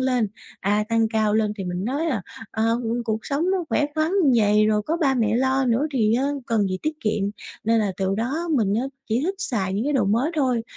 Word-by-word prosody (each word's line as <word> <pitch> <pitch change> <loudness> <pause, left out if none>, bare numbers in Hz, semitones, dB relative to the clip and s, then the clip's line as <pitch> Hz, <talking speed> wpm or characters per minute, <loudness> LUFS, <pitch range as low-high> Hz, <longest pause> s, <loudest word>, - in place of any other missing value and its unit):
lên, 250 -5 +1 0.3
à, 210 +2 +1
tăng 225 -1 +2
cao 215 -1 +2
lên 215 -1 +2
thì 190 - -3
mình 180 +2 -3
nói 285 +7 -1
là: 235 - -1 0.3
"À, 220 - -2 0.2
ừm, 235 +1 -1
cuộc 220 -1 -1
sống 305 +6 0
nó 375 -3 0
khỏe 295 - +2
khoắn 310 +1 +1
như 280 -5 +4
vầy, 210 -1 +4
rồi 210 -1 +2
có 320 +10 -1
ba 275 -6 +2
mẹ 225 -2 +1
lo 265 +1 +2
nữa 250 +5 +2
thì 225 -3 +2
á 260 +3 +1 0.2
cần 225 -3 +1
gì 185 0 -2
tiết 310 0 -2
kiệm." 210 -2 0 0.4
Nên 225 +1 +3
là 200 -3 0
từ 195 0 0
đó 275 +11 -2
mình 210 -6 +2
á, 230 - +1 0.3
chỉ 225 +3 +1
thích 375 +5 -1
xài 205 - -1
những 205 +5 -1
cái 295 - 0
đồ 255 -7 +2
mới 230 +10 +1
thôi, 250 -5 +1
230 Hz, 245 wpm, -23 LUFS, 210-270 Hz, 0.4 s, như